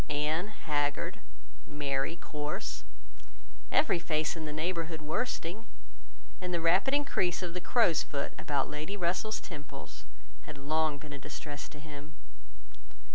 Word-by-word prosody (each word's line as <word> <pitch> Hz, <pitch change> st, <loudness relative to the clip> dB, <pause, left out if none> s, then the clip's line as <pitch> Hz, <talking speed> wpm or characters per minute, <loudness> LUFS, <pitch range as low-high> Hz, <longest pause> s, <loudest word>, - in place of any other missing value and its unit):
Anne 150 Hz, +5 st, +1 dB
haggard, 145 Hz, -8 st, 0 dB, 0.5 s
Mary 145 Hz, +1 st, 0 dB
coarse, 150 Hz, -3 st, -3 dB, 0.9 s
every 185 Hz, -, +5 dB
face 155 Hz, -2 st, +1 dB
in 160 Hz, -1 st, -4 dB
the 150 Hz, -, -3 dB
neighbourhood 165 Hz, +1 st, -1 dB
worsting, 180 Hz, +4 st, -1 dB, 0.7 s
and 180 Hz, -1 st, -2 dB
the 175 Hz, -, +2 dB
rapid 180 Hz, +9 st, +5 dB
increase 190 Hz, -12 st, +2 dB
of 175 Hz, -1 st, -2 dB
the 180 Hz, -, -2 dB
crow's 180 Hz, -6 st, +5 dB
foot 140 Hz, -1 st, -2 dB
about 140 Hz, -2 st, +1 dB
Lady 155 Hz, +7 st, -3 dB
Russell's 185 Hz, +4 st, +1 dB
temples 145 Hz, -6 st, -8 dB, 0.4 s
had -, -, -6 dB
long 155 Hz, +1 st, +2 dB
been 145 Hz, 0 st, -8 dB
a 140 Hz, -, -5 dB
distress 145 Hz, +1 st, -6 dB
to 150 Hz, -, -11 dB
him. 150 Hz, 0 st, -9 dB
155 Hz, 130 wpm, -33 LUFS, 150-175 Hz, 0.9 s, every